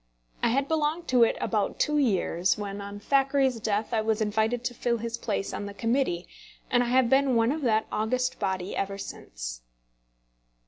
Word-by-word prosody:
I - - +3
had 270 +4 +1
belonged 320 +2 0
to 250 -1 +4
it 230 - +4
about 210 -3 -1
two 300 0 +2
years, 190 -7 +1
when, 200 -1 -5
on 200 0 -7
Thackeray's 270 +1 +2
death, 215 +2 -1
I 220 - +2
was 220 0 0
invited 220 +3 0
to 245 0 -2
fill 235 0 0
his 230 +1 -3
place 210 -4 -3
on 205 - -4
the 200 - -8
Committee, 230 -7 0 0.4
and 245 - +4
I 245 - 0
have 255 0 +4
been 270 0 +3
one 230 +1 +3
of 310 +2 -2
that 220 -4 +2
august 255 +4 -1
body 190 -2 -2
ever 195 0 -2
since. - - -7
230 Hz, 185 wpm, -27 LUFS, 205-260 Hz, 0.4 s, to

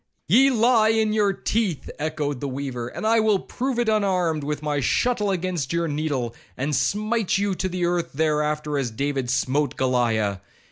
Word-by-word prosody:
'Ye 255 - +6
lie, 230 -2 +4
in 220 -1 +2
your 210 -2 +3
teeth,' 195 -4 -2
echoed 150 -3 -2
the 140 - -3
weaver; 130 -3 -4
'and 170 - -6
I 225 +1 +4
will 215 -2 +3
prove 255 +6 -3
it 240 -1 +1
unarmed, 185 -7 +1
with 150 +1 -3
my 145 -1 0
shuttle 210 - +1
against 180 -7 -2
your 170 0 0
needle, 145 -6 -2 0.2
and 140 +3 -1
smite 210 - 0
you 200 0 0
to 185 +1 -2
the 180 -1 -1
earth 175 -1 0
thereafter, 150 0 0
as 130 -3 -1
David 135 +2 -2
smote 140 +3 0
Goliah. 115 -7 +1
155 Hz, 175 wpm, -24 LUFS, 140-210 Hz, 0.2 s, Ye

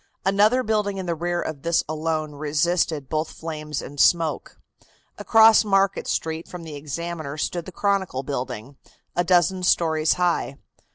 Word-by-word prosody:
Another 210 +6 +3
building 210 -3 0
in 190 - -4
the 170 - -1
rear 175 +2 -2
of 155 -3 -6
this 170 +1 +1
alone 155 0 -2
resisted 155 0 0
both 155 +2 -2
flames 155 -3 -5
and 145 0 -9
smoke. 165 0 +2 0.6
Across 225 0 +6
Market 195 -2 +1
Street 160 +1 -2
from 180 -2 -9
the 160 -2 -8
Examiner 155 0 -5
stood 170 +2 -3
the - - -7
Chronicle 190 -9 -1
building, 130 -1 -5 0.4
a 175 - +2
dozen 180 +1 +2
stories 160 -3 +2
high. 175 -6 0
165 Hz, 150 wpm, -23 LUFS, 150-185 Hz, 0.6 s, Across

